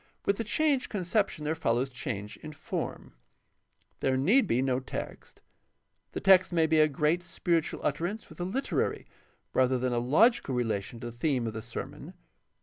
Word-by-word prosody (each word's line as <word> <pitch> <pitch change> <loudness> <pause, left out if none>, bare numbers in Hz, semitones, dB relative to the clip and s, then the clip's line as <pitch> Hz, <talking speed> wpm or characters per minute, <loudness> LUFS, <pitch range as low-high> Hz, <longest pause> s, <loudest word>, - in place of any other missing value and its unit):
With 200 - +2
the 230 - -1
changed 290 0 +1
conception 195 -4 -1
there 155 - +1
follows 130 -4 0
change 120 -6 -5
in 155 0 -9
form. - - -5 0.9
There 130 0 +1
need 210 - +4
be 125 -2 +2
no 130 -1 +1
text. 130 - -7 0.7
The - - -2
text 190 -2 +5
may 165 -2 +3
be 160 0 +3
a 155 - +6
great 150 +4 +1
spiritual 170 -2 -1
utterance 175 +9 -2
with - - -15
a - - -1
literary 210 +10 -1 0.5
rather 130 0 +3
than 125 0 -1
a 120 - +1
logical 150 - +3
relation 115 -2 -2
to 120 - -5
the - - -16
theme 130 -2 0
of 110 - -3
the 110 - -5
sermon. - - -8
150 Hz, 170 wpm, -29 LUFS, 125-180 Hz, 0.9 s, a